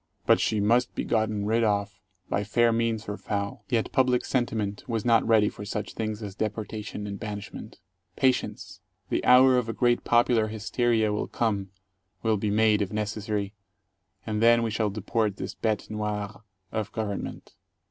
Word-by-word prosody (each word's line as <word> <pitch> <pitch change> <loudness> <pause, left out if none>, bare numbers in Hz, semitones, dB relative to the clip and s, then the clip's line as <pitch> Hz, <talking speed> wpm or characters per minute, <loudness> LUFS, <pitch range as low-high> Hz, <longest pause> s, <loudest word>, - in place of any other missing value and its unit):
But - - +5
she 110 - +1
must 120 +5 +2
be - - -2
gotten 110 -2 0
rid 115 +2 +2
of, 100 -2 0 0.3
by 100 - -1
fair 115 +3 +3
means 115 -1 -1
or 105 0 -4
foul. 100 0 -4
Yet 115 -2 0
public 125 -1 +2
sentiment 110 -5 -1
was 115 -2 -2
not 115 -2 +4
ready 110 -2 +5
for 105 - -6
such 105 -1 -4
things 110 -1 -4
as 100 -2 -6
deportation 105 0 -4
and 100 -1 -5
banishment. 105 -2 -7 0.4
Patience! 130 -1 0 0.3
The - - 0
hour 125 0 +7
of 115 -2 -4
a - - -1
great 120 0 +2
popular 120 -2 +3
hysteria 110 0 0
will 105 - -2
come, 100 -4 -1 0.5
will 110 -2 +2
be 105 +1 -1
made, 105 0 +3
if 100 - -2
necessary, 105 -1 -2 0.7
and 110 -1 -2
then 115 0 +5
we 115 - -1
shall 110 -1 0
deport 105 0 -1
this - - -5
bete 110 -2 -1
noir 105 0 -4 0.3
of 110 -2 -3
government. 105 -3 -4
110 Hz, 170 wpm, -27 LUFS, 105-115 Hz, 0.7 s, hour